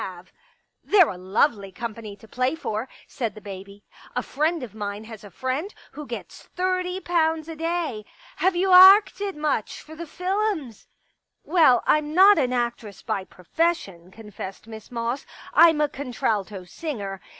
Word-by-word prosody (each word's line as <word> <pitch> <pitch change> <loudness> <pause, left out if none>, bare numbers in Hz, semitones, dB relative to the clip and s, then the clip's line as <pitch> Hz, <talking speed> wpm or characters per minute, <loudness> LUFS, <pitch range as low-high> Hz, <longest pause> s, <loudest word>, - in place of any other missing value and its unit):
i66 - - -3
I 185 -2 -9
Pictures - - -30 0.2
" - - -49
They're 375 -6 +6
a 180 - -6
lovely 195 +2 0
company 220 0 -7
to 215 +2 -17
play 255 +6 -1
for," 230 -5 -4 0.2
said 230 -5 -4
the - - -9
baby. 200 0 -10 0.2
" - - -21
A - - -1
friend 310 +1 -1
of 230 - -8
mine 205 0 -5
has 220 -2 -11
a 205 - -11
friend 260 - -3 0.2
who 300 -1 -9
gets 235 - -8
thirty 365 0 -1
pounds 320 -3 0
a 325 - -7
day.... 325 -9 -3 0.3
Have 375 0 +2
you 375 +2 +1
arcted 390 +2 +7
much 300 -7 -2
for 315 - -12
the^Z 335 +2 -10
lums? 370 - -2 0.2
" - - -48
*' - - -56
Well, 305 -9 +4
I'm 305 0 +1
not 390 0 +7
an 255 -3 +1
actress 235 -5 -3
by 190 - -3
profession," 190 - -2
con 210 +2 -13
fessed 190 0 -8
Miss 220 -1 -11
Moss. 235 +2 -3 0.2
'* - - -17
I'm 330 -2 +6
a 300 - +3
contralto 220 -8 -3
singer. 200 - -6
255 Hz, 185 wpm, -24 LUFS, 210-335 Hz, 0.3 s, arcted